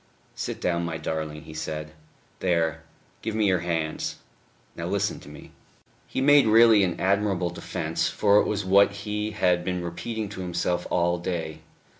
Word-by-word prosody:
"Sit -, -, -5 dB
down, 85 Hz, -1 st, 0 dB
my 85 Hz, -1 st, -3 dB
darling," 80 Hz, -1 st, -4 dB
he 80 Hz, -, -11 dB
said. 75 Hz, 0 st, -5 dB, 0.5 s
"There... 80 Hz, -3 st, 0 dB, 0.4 s
give 110 Hz, -1 st, -3 dB
me 110 Hz, -1 st, +2 dB
your 95 Hz, -3 st, +3 dB
hands. 80 Hz, -2 st, -2 dB, 0.6 s
Now -, -, -4 dB
listen -, -, -1 dB
to -, -, -13 dB
me." 75 Hz, -, -12 dB, 0.6 s
He -, -, -3 dB
made 145 Hz, -2 st, +6 dB
really 110 Hz, -1 st, +6 dB
an 90 Hz, -3 st, -1 dB
admirable 95 Hz, -2 st, +1 dB
defence, -, -, -2 dB
for 105 Hz, 0 st, +4 dB
it -, -, +1 dB
was 105 Hz, -2 st, -2 dB
what 100 Hz, +2 st, +5 dB
he 105 Hz, 0 st, -2 dB
had 90 Hz, -4 st, +1 dB
been 90 Hz, -1 st, -2 dB
repeating 110 Hz, +6 st, -4 dB
to 95 Hz, -2 st, -7 dB
himself 90 Hz, 0 st, -1 dB
all 85 Hz, 0 st, +1 dB
day. 85 Hz, -3 st, -4 dB
90 Hz, 165 wpm, -26 LUFS, 85-105 Hz, 0.6 s, made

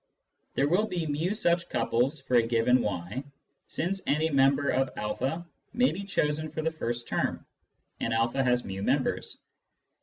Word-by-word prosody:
There 140 Hz, -, +3 dB
will 190 Hz, +8 st, +2 dB
be 175 Hz, -5 st, -2 dB
ft 160 Hz, +7 st, -1 dB
such 170 Hz, -4 st, +1 dB
couples 130 Hz, +6 st, +1 dB
for 130 Hz, -, -6 dB
a -, -, +7 dB
given 120 Hz, +2 st, +3 dB
y, 100 Hz, +5 st, -3 dB, 0.4 s
since 190 Hz, +4 st, -2 dB
any 155 Hz, +2 st, +2 dB
member 140 Hz, 0 st, +3 dB
of 135 Hz, 0 st, +2 dB, 0.3 s
a 160 Hz, +7 st, -1 dB, 0.3 s
may 250 Hz, +2 st, +3 dB
be 200 Hz, -, -5 dB
chosen 155 Hz, -4 st, 0 dB
for 155 Hz, -, -4 dB
the 160 Hz, -, +1 dB
first 120 Hz, -6 st, -4 dB
term, -, -, -1 dB, 0.5 s
and 115 Hz, -, -1 dB
a 115 Hz, +4 st, +1 dB
has 125 Hz, -1 st, +2 dB
/j, 95 Hz, 0 st, -5 dB
members. -, -, 0 dB
140 Hz, 160 wpm, -28 LUFS, 120-165 Hz, 0.5 s, a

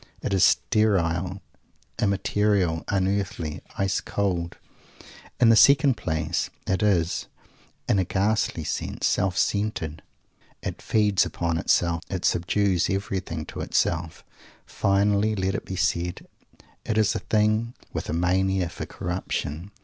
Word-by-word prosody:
It -, -, -1 dB
is 95 Hz, -, +3 dB
sterile, 90 Hz, +3 st, +2 dB, 0.6 s
immaterial, 100 Hz, -4 st, +1 dB
unearthly, 95 Hz, -5 st, -1 dB, 0.2 s
ice 95 Hz, 0 st, 0 dB
cold. 90 Hz, -4 st, -2 dB, 0.8 s
In 120 Hz, -2 st, +6 dB
the 115 Hz, -, +7 dB
second 140 Hz, +2 st, +6 dB
place, 80 Hz, -3 st, -2 dB, 0.2 s
it 95 Hz, +2 st, 0 dB
is, 90 Hz, -5 st, +1 dB, 0.6 s
in 100 Hz, -, +3 dB
a -, -, +3 dB
ghastly 100 Hz, -2 st, 0 dB
sense, -, -, -3 dB
self 95 Hz, -3 st, +1 dB
centered! 80 Hz, -2 st, -1 dB, 0.6 s
It -, -, -5 dB
feeds 105 Hz, -3 st, +2 dB
upon 85 Hz, -1 st, -2 dB
itself. 85 Hz, 0 st, +1 dB
It 95 Hz, -2 st, -3 dB
subdues 90 Hz, +1 st, +1 dB
everything 95 Hz, -4 st, -3 dB
to -, -, -7 dB
itself. 80 Hz, -1 st, -1 dB, 0.4 s
Finally, 100 Hz, +2 st, +1 dB
let 95 Hz, -1 st, -1 dB
it -, -, -4 dB
be 95 Hz, -, -5 dB
said, 90 Hz, -1 st, -1 dB, 0.6 s
it 110 Hz, -, -2 dB
is 105 Hz, -1 st, +3 dB
a -, -, -2 dB
thing 110 Hz, +2 st, +1 dB, 0.2 s
with -, -, -4 dB
a -, -, -1 dB
mania 90 Hz, +1 st, +1 dB
for -, -, -7 dB
Corruption. 85 Hz, -1 st, -4 dB
95 Hz, 125 wpm, -25 LUFS, 85-105 Hz, 0.8 s, the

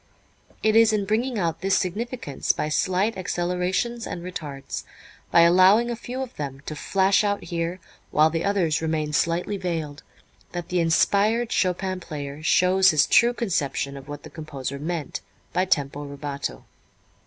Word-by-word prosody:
It 215 Hz, 0 st, +3 dB
is 225 Hz, -1 st, +6 dB
in 210 Hz, -2 st, 0 dB
bringing 230 Hz, +4 st, 0 dB
out 170 Hz, -5 st, -1 dB
this 195 Hz, +1 st, +2 dB
significance 205 Hz, -, -2 dB
by 150 Hz, -, -2 dB
slight 185 Hz, +7 st, +1 dB
accelerations 180 Hz, +6 st, -1 dB
and 170 Hz, -, -6 dB
retards, 150 Hz, -6 st, -6 dB, 0.5 s
by 170 Hz, -, +6 dB
allowing 185 Hz, +7 st, +6 dB
a -, -, -2 dB
few 250 Hz, +3 st, -5 dB
of 255 Hz, -, -10 dB
them 140 Hz, -2 st, -5 dB
to 155 Hz, -, -5 dB
flash 190 Hz, +5 st, +2 dB
out 205 Hz, -1 st, 0 dB
here 170 Hz, +1 st, -3 dB, 0.3 s
while 155 Hz, +1 st, +4 dB
the 165 Hz, 0 st, -1 dB
others 185 Hz, -7 st, +1 dB
remain 155 Hz, -2 st, -1 dB
slightly 170 Hz, +6 st, 0 dB
veiled, 160 Hz, -6 st, -4 dB, 0.5 s
that 175 Hz, -1 st, -5 dB
the 180 Hz, -, +1 dB
inspired 205 Hz, +8 st, +2 dB
Chopin 185 Hz, 0 st, 0 dB
player 145 Hz, -3 st, -7 dB
shows 185 Hz, +4 st, +4 dB
his 155 Hz, -4 st, +4 dB
true 235 Hz, +2 st, +5 dB
conception 140 Hz, -, -1 dB
of 135 Hz, 0 st, -10 dB
what 145 Hz, 0 st, -8 dB
the -, -, -11 dB
composer 140 Hz, -4 st, -6 dB
meant 160 Hz, 0 st, -4 dB, 0.3 s
by 185 Hz, -, +2 dB
tempo 145 Hz, -5 st, 0 dB
rubato. 140 Hz, 0 st, -5 dB
180 Hz, 155 wpm, -24 LUFS, 155-200 Hz, 0.5 s, is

